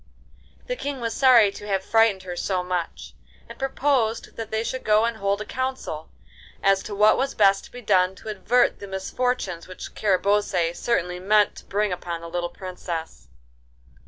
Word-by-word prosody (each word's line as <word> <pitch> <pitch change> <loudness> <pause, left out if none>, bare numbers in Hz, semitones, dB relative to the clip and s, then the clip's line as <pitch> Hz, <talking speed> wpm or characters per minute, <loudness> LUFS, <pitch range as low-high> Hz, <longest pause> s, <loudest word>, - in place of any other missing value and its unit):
The - - -3
King 285 - -4
was 230 -1 -2
sorry 240 -6 +6
to 205 +1 -10
have 195 -2 -1
frightened 225 -4 +3
her 180 -1 -6
so 180 0 -1
much, 180 -2 -4 0.3
and - - -12
proposed 265 -4 0
that 225 -1 -6
they 220 +1 -1
should 260 +2 -4
go 215 +1 +4
and 235 -1 -2
hold 200 0 0
a - - -4
council 260 -12 -4 0.5
as 195 0 +4
to 205 - -5
what 210 +1 +5
was 270 +1 -1
best 195 -2 +4
to - - -16
be 245 0 -10
done 185 -2 +3
to 220 - -9
avert 215 +5 +2
the 200 - -8
misfortunes 190 -1 -2
which 185 - -9
Carabosse 195 -3 +1
certainly 180 -5 -1
meant 210 +2 +3
to - - -11
bring 205 -1 0
upon 170 -1 -5
the 170 - -8
little 175 0 -2
Princess. 170 - -7
205 Hz, 180 wpm, -24 LUFS, 185-230 Hz, 0.5 s, sorry